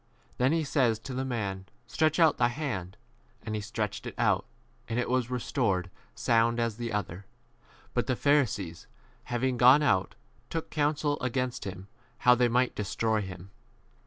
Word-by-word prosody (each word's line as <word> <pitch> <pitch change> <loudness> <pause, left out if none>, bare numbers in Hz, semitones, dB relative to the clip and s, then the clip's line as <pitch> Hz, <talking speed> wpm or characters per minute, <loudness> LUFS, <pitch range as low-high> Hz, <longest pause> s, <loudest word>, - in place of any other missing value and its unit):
Then 130 +2 +3
he 165 0 +1
says 130 -6 +2
to 120 +4 -8
the 130 +1 -2
man, 100 -7 -3 0.2
Stretch 155 +8 +1
out 165 -2 +5
thy 120 - +4
hand. 115 - -4 0.5
And 110 - -4
he 105 - -2
stretched 105 -1 -4
[it] - - -7
out, - - +2 0.4
and 115 - -2
it 125 - 0
was 125 -1 0
restored 115 -7 -1 0.2
sound 115 0 +2
as 115 -2 -1
the 120 -1 -3
u - - -5
other. 100 -2 -4 0.7
But 120 - 0
the 130 - +1
Pharisees, 110 - +1 0.4
having 125 +1 -1
gone 130 +5 +7
out, 95 -10 +1 0.3
took 165 -1 -4
counsel 145 -1 0
against 125 -1 -2
him 95 0 -7 0.3
how 125 - +6
they 125 0 +3
might 125 +2 +2
destroy 110 +1 -1
him. 95 -1 -8
120 Hz, 165 wpm, -29 LUFS, 105-130 Hz, 0.7 s, gone